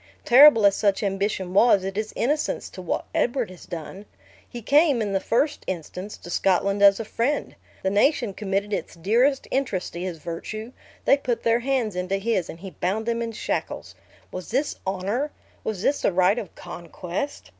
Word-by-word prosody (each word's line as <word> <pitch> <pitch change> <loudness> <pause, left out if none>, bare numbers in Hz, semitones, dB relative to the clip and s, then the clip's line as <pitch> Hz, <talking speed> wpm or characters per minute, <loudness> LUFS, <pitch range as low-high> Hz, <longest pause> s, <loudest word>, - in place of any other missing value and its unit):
Terrible 245 -3 +8
as 200 -1 +5
such 200 0 +1
ambition 195 -2 -1
was, 200 -1 +5
it 195 0 -4
is 215 +1 -2
innocence 295 +5 -1
to - - -8
what - - -2
Edward 245 -4 0
has 180 - -13
done. 180 +4 -8 0.4
He 240 -2 -8
came, 285 +1 +4
in 205 -3 -1
the 195 - +2
first 285 +9 0
instance, 185 +3 -5
to 175 - -10
Scotland 195 +2 +1
as 200 0 +7
a 225 - -4
friend; 240 +7 -1 0.3
the 190 - +1
nation 230 +1 +2
committed 200 +1 -2
its - - -3
dearest 235 - +2
interests 250 -9 -1
to 170 - -7
his 180 -2 -4
virtue; 215 +8 -6 0.3
they 275 - +5
put 245 -4 -2
their 230 0 +3
hands 245 -5 -1
into 185 +2 -1
his 195 -4 -1
and 165 - -9
he 190 -1 -7
bound 205 +6 -2
them 235 0 -1
in 230 -1 -3
shackles. 225 - -4 0.4
Was 185 -1 -7
this 270 +6 0
honor? 200 +10 -1 0.3
Was 210 -3 -3
this 285 - +1
the - - +2
right 185 +5 +3
of 200 - -9
conquest? 175 - -6
205 Hz, 185 wpm, -24 LUFS, 185-240 Hz, 0.4 s, Terrible